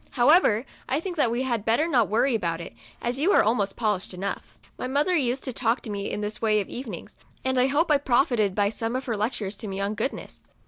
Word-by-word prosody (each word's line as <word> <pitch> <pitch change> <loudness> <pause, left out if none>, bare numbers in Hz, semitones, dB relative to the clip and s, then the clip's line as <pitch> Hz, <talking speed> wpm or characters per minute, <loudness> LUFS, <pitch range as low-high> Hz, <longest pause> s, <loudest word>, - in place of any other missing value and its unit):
However, 245 - +5 0.2
I 270 - +1
think 360 +1 -5
that 270 -6 +3
we 240 +3 -1
had 235 -5 -1
better 235 +9 +2
not 245 - +2
worry 240 +5 +2
about 170 -7 -1
it, 170 - -8 0.3
as 245 +2 -1
you 340 +8 +3
are - - +6
almost 210 -3 0
polished 210 -5 -1
enough." 195 +2 -5 0.2
My - - -4
mother 290 +7 +1
used 265 -3 0
to 260 - -4
talk 230 0 +1
to 220 - -7
me 200 0 -3
in 210 - -3
this 210 0 -4
way 215 -2 +3
of 200 - -3
evenings, 235 -9 -7 0.3
and 260 -1 +1
I 255 - +4
hope 305 +4 +1
I 290 - +5
profited 240 -7 +2
by 205 -1 +2
some 225 +2 -3
of 260 - -3
her 235 - -1
lec 215 +5 -1
tures 205 -3 -4
to 215 - -5
me 195 0 -4
on 200 +1 -1
goodness. 225 +6 -5
235 Hz, 245 wpm, -25 LUFS, 210-265 Hz, 0.3 s, are